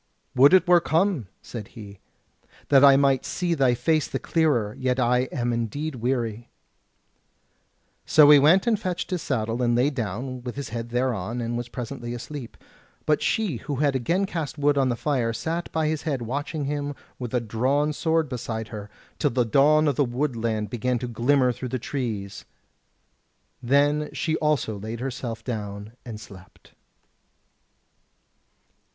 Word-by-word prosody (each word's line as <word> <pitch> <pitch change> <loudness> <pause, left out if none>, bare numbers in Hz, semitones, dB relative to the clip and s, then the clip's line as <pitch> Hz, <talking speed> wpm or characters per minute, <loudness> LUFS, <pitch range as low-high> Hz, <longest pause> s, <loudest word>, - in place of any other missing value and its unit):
"Would 140 +7 +7
it 185 - +4
were 175 -1 +6
come," 165 - +1 0.2
said 110 -4 -7
he, 100 -3 -10 0.7
"that 140 -1 +6
I 140 -1 +8
might 135 -2 +3
see 175 -1 -1
thy 135 -5 +3
face 155 +5 +1
the - - -3
clearer; 135 -11 +1
yet 130 0 0
I 125 +1 +2
am 120 -2 -1
indeed 145 +7 -3
weary." 120 -2 -2 1.6
So 150 -2 +7
he 145 - +9
went 160 +7 +5
and 225 -3 +2
fetched 185 -4 -3
his 180 -3 -1
saddle 115 -3 -2
and 120 -1 +2
lay 130 +5 +2
down 125 +1 -4
with 125 -1 -6
his 140 0 -5
head 115 +1 -5
thereon; 120 -3 -1
and 120 0 -3
was 120 0 -4
presently 120 -1 -6
asleep. 125 +1 -8 0.5
But 150 -1 +2
she, 205 - 0
who 145 +5 -5
had 140 0 +1
again 170 +10 +1
cast 160 -5 -4
wood 145 0 +2
on 135 -2 +2
the 120 - 0
fire, 120 -4 -1
sat 165 +8 -3
by 160 -1 0
his 155 0 -1
head 140 -6 -2
watching 145 +5 -3
him 145 0 -3 0.2
with 120 -3 -5
a - - +3
drawn 130 +7 0
sword 160 +1 +1
beside 115 -3 -5
her, 105 -2 -7 0.3
till - - +2
the 125 0 +1
dawn 150 +6 +4
of 140 - 0
the 145 - +4
woodland 115 -5 -2
began 125 +1 0
to 125 +1 -4
glimmer 125 +2 +2
through 125 +1 -6
the 130 - -2
trees: 115 -6 -4 1.2
then 145 +4 +2
she 160 -1 -1
also 145 -9 0
laid 110 +3 -6
herself 120 -3 -5
down 105 -3 -5
and 110 -3 -8
slept. 95 -3 -15
130 Hz, 165 wpm, -25 LUFS, 115-150 Hz, 1.6 s, he